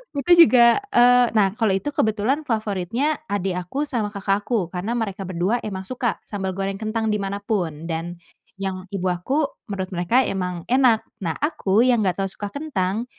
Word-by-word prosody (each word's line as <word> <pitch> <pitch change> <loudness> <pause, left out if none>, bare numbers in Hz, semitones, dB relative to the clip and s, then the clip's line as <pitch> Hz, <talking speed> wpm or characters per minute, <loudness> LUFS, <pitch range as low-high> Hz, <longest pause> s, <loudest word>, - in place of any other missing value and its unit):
Itu 285 +5 -1 0.2
juga, 235 -2 +5
eee, 245 - +4
nah 195 -3 +4
kalau 215 -1 0
itu 245 +10 -2
kebetulan 255 +5 0
favoritnya 220 - -1
adik 190 -4 -1
aku 280 +10 -2
sama 235 -7 -2
kakak 200 -1 -1
aku 200 -9 -1
karena 195 +6 -3
mereka 195 -4 -3
berdua 185 +6 0
emang 190 -3 -5
suka 240 +2 -2
sambal 190 -3 -4
goreng 195 0 -3
kentang 220 0 -1
di 210 - 0
mana 200 +1 -4
pun, 175 -8 -2
dan 165 +2 -3 0.4
yang 190 -1 -4
ibu 190 -2 -4
aku, 265 - 0 0.2
menurut 190 -2 -4
mereka 185 +9 +2
emang 180 -3 -3
enak. 250 -4 +4 0.2
Nah 165 -3 -2
aku 235 -8 +1
yang 245 -3 +3
gak 185 -3 0
terlalu 195 -1 -2
suka 205 - -5
kentang, 225 -7 -2
205 Hz, 180 wpm, -22 LUFS, 190-240 Hz, 0.4 s, juga